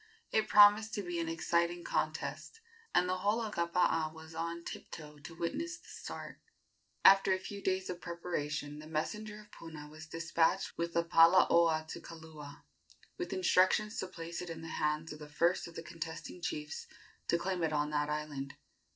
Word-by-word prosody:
It 220 - +2
promised 210 +1 +7
to 205 - -2
be 175 -1 -3
an 165 -1 -1
exciting 170 +1 0
contest, 450 - -2 0.4
and 180 - +4
the 185 0 0
whole 210 +4 +2
of 220 -2 -3
Kapaa 170 -2 +1
was 160 0 -12
on 170 +1 -3
tiptoe 150 -3 -8
to 165 +3 -10
witness 330 - -3
the - - -18
start. - - -8 0.7
After 195 0 +8
a - - +1
few 200 +2 -7
days 190 0 0
of 180 -1 -5
preparation 150 -4 -3
the 155 - -10
messenger 210 +7 -3
of 210 0 -19
Puna 155 -3 -9
was 155 +1 -11
despatched 165 0 +1
with 170 0 -2
the 170 - +3
palaoa 165 -1 +5
to - - -6
Kaula, 155 -3 -11 0.6
with 360 - -3
instructions 190 +3 +3
to 185 - -2
place 170 -1 -6
it 180 - -6
in 165 -1 -6
the 165 - -6
hands 150 +1 0
of 150 - -11
the 150 -1 -9
first 170 +5 +1
of 170 - -12
the 165 - -6
contesting 165 +1 -7
chiefs 150 -3 -4 0.4
to 170 - +3
claim 180 +1 -2
it 160 -1 +1
on 150 0 0
that 150 0 0
island. 150 -2 -4
170 Hz, 180 wpm, -33 LUFS, 155-185 Hz, 0.7 s, After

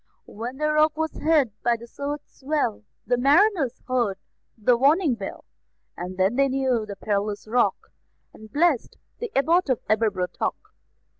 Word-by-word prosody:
When 240 +5 -7
the 305 +1 +1
Rock 305 0 +3
was 320 0 -1
hid 300 -7 +2
by 240 -1 +2
the 235 - -11
surge's 285 +4 -6
swell, 270 - -1 0.2
The 245 0 +1
mariners 290 - +3
heard 240 -7 0 0.4
the 235 +3 +3
warning 285 +4 +3
bell; 200 -4 -7 0.5
And 180 +1 -6
then 190 +6 +2
they 275 0 +4
knew 260 -4 0
the 200 - -6
perilous 205 +1 -2
Rock, 240 +3 0 0.4
And 220 0 -14
blessed 305 -4 +1 0.2
the 475 - -4
Abbot 325 +4 +3
of 255 - +2
Aberbrothock. 205 -4 0
255 Hz, 150 wpm, -24 LUFS, 215-300 Hz, 0.5 s, they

